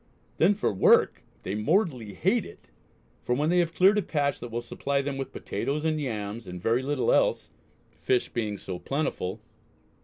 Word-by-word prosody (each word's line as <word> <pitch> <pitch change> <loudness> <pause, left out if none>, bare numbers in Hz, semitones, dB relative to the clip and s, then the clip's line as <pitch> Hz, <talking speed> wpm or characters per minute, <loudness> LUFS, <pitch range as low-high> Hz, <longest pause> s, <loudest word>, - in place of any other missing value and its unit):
Then 190 +6 +4
for 195 - 0
work 95 - +4 0.2
they 95 - -3
mortally 125 - 0
hate - - +2
it, - - -14 0.5
for 125 - 0
when 150 +5 +1
they 180 - +4
have 170 -1 0
cleared 195 +3 +5
a - - +1
patch 145 -6 -1
that 120 - -7
will 115 +1 -3
supply 140 +4 -2
them 140 0 -3
with 135 0 -5
potatoes 150 +3 -3
and 155 -1 0
yams 110 -4 -4
and 90 0 -6
very 115 +7 +1
little 140 -1 +1
else, - - +1 0.5
fish 125 -1 +1
being 105 -3 -3
so 95 -2 -6
plentiful.... 135 -10 -3
135 Hz, 180 wpm, -27 LUFS, 110-155 Hz, 0.5 s, cleared